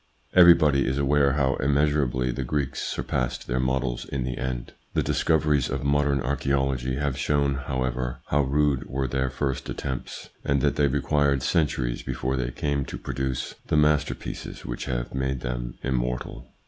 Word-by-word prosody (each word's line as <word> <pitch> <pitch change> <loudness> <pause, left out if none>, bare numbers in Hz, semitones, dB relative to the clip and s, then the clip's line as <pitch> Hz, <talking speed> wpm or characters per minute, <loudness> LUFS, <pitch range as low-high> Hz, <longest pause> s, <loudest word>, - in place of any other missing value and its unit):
Everbody 85 -6 +6
is 65 - 0
aware 70 0 +3
how 65 -2 +1
immeasurably 70 -3 +1
the 65 - -3
Greeks 70 0 -2
surpassed 65 -1 -2
their 65 0 -1
models 65 -1 0
in 70 -2 -3
the 65 0 -3
end. 65 -1 -4 0.2
The - - +2
discoveries 75 -4 +2
of - - -2
modern 70 -1 +2
archaeology 65 -1 0
have 70 -1 -1
shown, 70 -1 +2
however, 65 -2 -2
how 75 - +3
rude 70 -1 +1
were 65 0 -1
their 65 +1 0
first 65 0 -3
attempts, 65 -3 -5
and 70 0 +2
that - - +2
they 75 - +3
required 70 0 +1
centuries 65 -7 0
before 65 +2 -2
they 65 -2 -1
came 70 +1 -1
to - - -6
produce 65 -1 -3
the - - +2
master 75 0 +3
pieces - - -7
which - - -4
have - - -3
made 65 -1 -1
them - - -4
immortal. 60 -2 -2
65 Hz, 160 wpm, -26 LUFS, 65-70 Hz, 0.2 s, Everbody